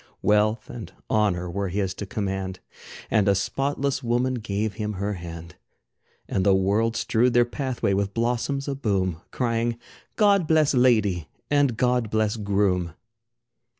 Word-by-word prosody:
Wealth 105 +2 +2
and 115 -7 -8 0.2
honor 100 -5 +1
were 100 +3 -2
his 95 0 -1
to 100 - -7
command, 95 -2 -3 0.5
And 105 -3 +3
a 100 - +4
spotless 140 +6 -1
woman 125 +1 +1
gave 110 -2 -2
him 105 +1 -3
her 100 +2 -2
hand. 85 -1 -8 0.7
And 95 - 0
the 95 0 +5
world 105 +4 +1
strewed 120 +2 +1
their 120 0 +6
pathway 125 -5 -2
with 100 0 -1
blossoms 125 +4 -1
aboom, 100 - -1
Crying 115 -1 -1 0.4
"God 200 -5 +4
bless 155 -2 +3
ladye, 110 - +3 0.2
and 140 -5 +3
God 125 -2 +1
bless 110 0 +1
groom!" 100 -5 0
110 Hz, 140 wpm, -25 LUFS, 95-125 Hz, 0.7 s, their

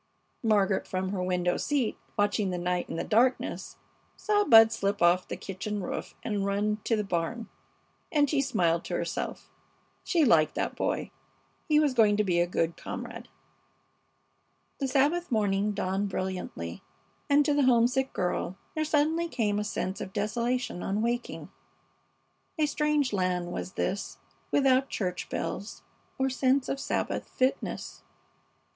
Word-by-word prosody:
Margaret, 205 -4 +2
from 185 0 -2
her 190 -1 -2
window 180 -1 0
seat 275 -7 0 0.2
watching 205 -1 +1
the 180 - -2
night 180 0 -1
in - - -4
the - - -2
darkness, 245 +4 +1 0.4
saw 415 -1 +2
Bud 225 - +8
slip 200 -2 -1
off 175 +1 +4
the - - -5
kitchen 200 +2 -4
roof - - -5
and 205 -3 -1
run 205 +2 0
to 230 - +2
the 210 - -1
barn, 195 +5 -2 0.6
and 290 -2 +3
she 280 0 +1
smiled 170 -10 +1
to - - -3
herself. - - -4 0.5
She 340 -5 +3
liked 155 - +4
that - - -2
boy. - - -2 0.6
He 300 -1 +5
was 295 -3 +2
going 215 -4 +4
to 210 - +3
be 180 -4 +1
a 175 - +3
good 165 -1 0
comrade. - - -7 1.5
The 275 - 0
Sabbath 290 +6 +1
morning 205 -2 +1
dawned 195 0 -1
brilliantly, 185 - -4 0.5
and 290 0 +5
to 295 - +2
the 285 -2 +3
homesick 255 +2 +3
girl 180 0 -2 0.2
there 310 - 0
suddenly 315 +3 +2
came 210 -9 0
a - - -1
sense 195 -2 -3
of 190 - -6
desolation 235 -1 -1
on 205 +3 -1
waking. 240 +1 -3 1.1
A 310 - +3
strange 295 -3 +1
land 180 -2 0
was 185 - -5
this, 200 - -2 0.3
without 270 -1 +3
church 180 -3 -3
bells 200 +3 -4 0.3
or 265 -1 +1
sense 260 0 +1
of 275 - -2
Sabbath - - -2
fitness. 260 +1 -2
210 Hz, 150 wpm, -28 LUFS, 185-265 Hz, 1.5 s, Bud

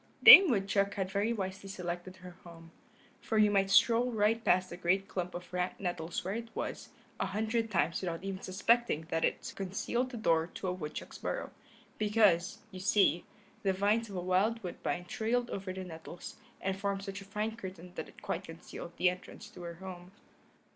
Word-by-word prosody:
Dame 390 -5 +12
Woodchuck 200 -3 +1
had 190 -1 -2
very 205 +3 +1
wisely 195 -2 -4
selected 180 -1 -5
her 180 -1 -12
home, 165 -1 -13 0.5
for 220 - -1
you 210 -1 +5
might 195 -1 +2
stroll 235 +4 +5
right 225 +1 +2
past 185 -3 +2
the - - -5
great 185 +2 +1
clump 180 -2 -4
of 180 +1 -8
rank 180 0 -2
nettles 175 -3 -3
where 190 - -2
it 230 +1 -5
was, - - -4 0.3
a - - 0
hundred 225 +2 -1
times 170 - +1
without 175 -1 -4
even 195 -1 -4
suspecting 215 -3 +1
that 165 0 0
it - - -1
concealed 200 +6 -2
the 245 - -7
door 165 -6 +2
to 190 - -4
a 180 - 0
woodchuck's 155 -5 -7
burrow, - - -3 0.5
because, 205 -5 +3
you 185 - -8
see, 190 -2 +3 0.4
the 195 -2 +1
vines 210 +4 +1
of 195 - -7
a 180 - -2
wild 195 +6 +1
woodbine 175 0 -3
trailed 240 +5 -1
over 190 -1 -4
the 185 0 -5
nettles, 170 0 -9 0.3
and 190 0 -2
formed 200 -1 -2
such 195 0 -6
a - - -9
fine 210 +2 -3
curtain 185 -5 -9
that - - -6
it - - -17
quite - - -3
concealed 165 +1 -9
the 185 - +3
entrance 185 +3 -4
to 180 - -11
her 170 -1 -6
home. 180 0 -9
190 Hz, 190 wpm, -32 LUFS, 180-210 Hz, 0.5 s, Dame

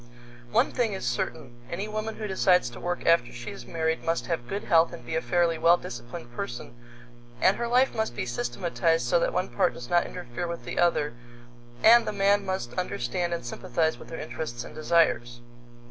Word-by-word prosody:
One - - +3
thing 230 -4 0
is 190 - -4
certain: 120 0 -3
Any 195 +5 -3
woman 215 +1 -4
who 220 - -5
decides 180 -7 +3
to 120 - -10
work 175 0 -3
after 165 -8 +4
she 120 0 -7
is 200 - -10
married 160 -1 -1
must 165 0 0
have 165 -9 -3
good 200 +1 -3
health 165 -2 +4
and 120 - -9
be 120 - -3
a 160 - +1
fairly 170 -2 +1
well 170 +1 +6
disciplined 120 -2 -8
person, 120 0 -6 0.7
and 190 - +4
her 235 - -1
life 250 +3 +3
must 220 - -2
be - - -2
systematized 125 +6 0
so 170 +8 +3
that - - +1
one 180 +1 -1
part 180 -10 +1
does 125 +3 -9
not 175 -1 +3
interfere 175 -1 -5
with 170 0 -6
the - - -3
other, 170 -6 +2 0.7
and 235 +2 +7
the 215 - -1
man 200 0 +3
must 190 -11 -3
understand 175 +1 -2
and 170 -6 -3
sympathize 160 +6 -1
with - - -12
her 165 - -6
interests 155 -6 -5
and - - -10
desires. 155 -7 +2
170 Hz, 200 wpm, -27 LUFS, 120-190 Hz, 0.7 s, and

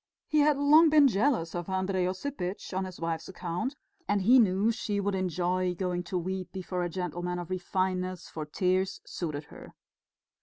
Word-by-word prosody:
He 305 - +2
had 295 -1 +4
long 305 +3 +6
been 300 -2 +7
jealous 215 - +1
of 175 +1 -4
Andrey 190 -1 0
Osipitch 185 -2 -4
on 190 +1 -1
his 185 -1 -9
wife's 165 +1 -3
account, 180 - -3 0.3
and 205 -2 +1
he 250 +6 +7
knew 205 0 +3
she 215 -3 -2
would 200 0 0
enjoy 180 0 0
going 180 -1 -1
to 180 - -2
weep 185 +1 -3
before 185 -1 -4
a 175 - -1
gentleman 180 0 -3
of 175 0 -6
refinement, 185 0 -1
for 155 - -7
tears 185 +4 0
suited 155 -4 -4
her. - - -12
185 Hz, 175 wpm, -29 LUFS, 180-200 Hz, 0.3 s, been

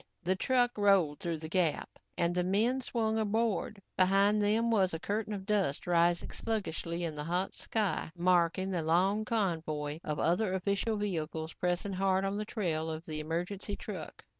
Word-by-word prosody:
The 185 +2 +1
truck 245 +2 +1
rolled 190 -8 +4
through 170 -2 -2
the 160 0 -7
gap 170 -2 0 0.2
and 170 0 +1
the 180 0 +1
men 220 +8 +2
swung 225 -3 0
aboard. 220 0 0 0.2
Behind 195 +3 +4
them 220 +3 +2
was 190 -6 +2
a - - -4
curtain 210 +4 -2
of 195 -2 -4
dust 195 -9 0
rising 175 0 +2
sluggishly 175 -6 -2
in 165 -2 -2
the 150 0 -5
hot 180 +3 -1
sky, 215 -7 -1
marking 180 +1 +2
the 175 -3 0
long 185 +7 +2
convoy 160 -8 -1
of 150 -1 -3
other 185 +3 +1
official 200 +3 0
vehicles 160 -5 -3
pressing 180 +2 -1
hard 190 0 +1
on 195 +1 -1
the 215 - -2
trail 165 -8 -1
of 160 +1 -5
the 155 -1 -4
emergency 180 +6 -3
truck. 185 -8 -8
190 Hz, 170 wpm, -31 LUFS, 170-210 Hz, 0.2 s, rolled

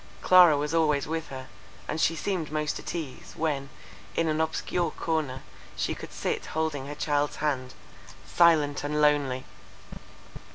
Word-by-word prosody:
—Clara 180 -5 +7
was 150 +2 -2
always 150 -4 +2
with 160 0 -3
her, 130 -1 -8 0.4
and 160 - -2
she 165 - +3
seemed 175 -3 -2
most 150 -1 -1
at - - -6
ease, 155 -6 -6
when, 145 -4 -1 0.5
in 165 - +1
an 155 0 +1
obscure 170 +2 -1
corner, 155 -6 -2 0.3
she - - -1
could - - -9
sit - - -2
holding 155 -4 -2
her 145 - -6
child's 145 0 0
hand, 130 -4 -2 0.5
silent 155 -5 +3
and 150 +1 -1
lonely. 145 -4 +2
150 Hz, 150 wpm, -27 LUFS, 145-160 Hz, 0.5 s, Clara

